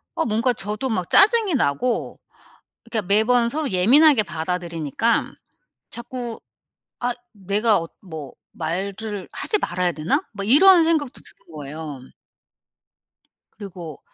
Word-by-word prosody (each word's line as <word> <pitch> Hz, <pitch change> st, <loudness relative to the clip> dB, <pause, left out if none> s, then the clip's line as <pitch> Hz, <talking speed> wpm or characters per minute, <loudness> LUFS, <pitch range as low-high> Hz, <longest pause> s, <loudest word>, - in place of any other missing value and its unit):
아 325 Hz, -, 0 dB
뭔가 230 Hz, +3 st, +1 dB
저도 215 Hz, +5 st, -3 dB
막 185 Hz, -7 st, -2 dB
짜증이 430 Hz, -4 st, +4 dB
나고. 230 Hz, -, -1 dB, 0.7 s
그러니까 220 Hz, -4 st, -2 dB
매번 235 Hz, +4 st, +3 dB
서로 300 Hz, +1 st, -2 dB
예민하게 245 Hz, -, +5 dB
받아들이니까 170 Hz, +3 st, -2 dB, 0.6 s
자꾸 240 Hz, -1 st, -6 dB, 0.6 s
'아 245 Hz, 0 st, 0 dB, 0.2 s
내가 205 Hz, +2 st, +1 dB
어 165 Hz, -, -6 dB
뭐 160 Hz, -7 st, -9 dB, 0.2 s
말을 195 Hz, +5 st, -5 dB
하지 425 Hz, -, 0 dB
말아야 180 Hz, -, -1 dB
되나?' 155 Hz, +1 st, -1 dB
막 200 Hz, -1 st, -6 dB
이런 350 Hz, +7 st, +7 dB
생각도 310 Hz, -5 st, 0 dB
드는 -, -, -17 dB
거예요. 150 Hz, -1 st, -8 dB, 1.6 s
그리고 175 Hz, -7 st, -9 dB
210 Hz, 250 characters per minute, -22 LUFS, 175-250 Hz, 1.6 s, 이런